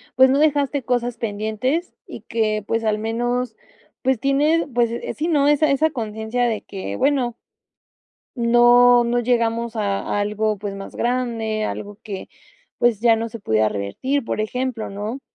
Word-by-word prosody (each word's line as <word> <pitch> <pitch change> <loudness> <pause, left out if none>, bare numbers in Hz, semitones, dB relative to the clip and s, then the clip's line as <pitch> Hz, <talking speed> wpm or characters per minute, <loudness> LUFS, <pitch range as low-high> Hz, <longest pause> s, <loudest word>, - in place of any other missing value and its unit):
pues 260 0 +6
no 280 - +3
dejaste 285 -2 +2
cosas 245 0 -1
pendientes 220 - -2
y - - -8
que, 215 -2 -1
pues, 225 0 0
al 215 -1 +1
menos, 240 +2 -2 0.5
pues 260 -3 +1
tienes, 295 +5 +2
pues, 235 -1 +2
eh, 235 - -4
sí, 315 +3 -2
¿no?, 290 -3 +3
Esa 295 +1 +4
esa 315 +3 +3
conciencia 220 -1 -3
de 225 -2 -1
que 190 - -6
bueno 255 - +1 1.0
No, 240 +1 +6
no 240 +1 +1
llegamos 235 -1 0
a 205 -1 -1
algo, 210 +1 0
pues 200 0 -5
más 195 0 -9
grande, 230 -3 -1
algo 205 0 -6
que, 200 -4 -7 0.5
pues, 235 -4 +2
ya 230 -1 +5
no 225 +1 -2
se 230 0 -9
pudiera 110 - +1
revertir, 175 - -2
por 220 - -3
ejemplo, 250 +1 -2
¿no? 210 +6 -5
235 Hz, 160 wpm, -21 LUFS, 215-255 Hz, 1.0 s, pues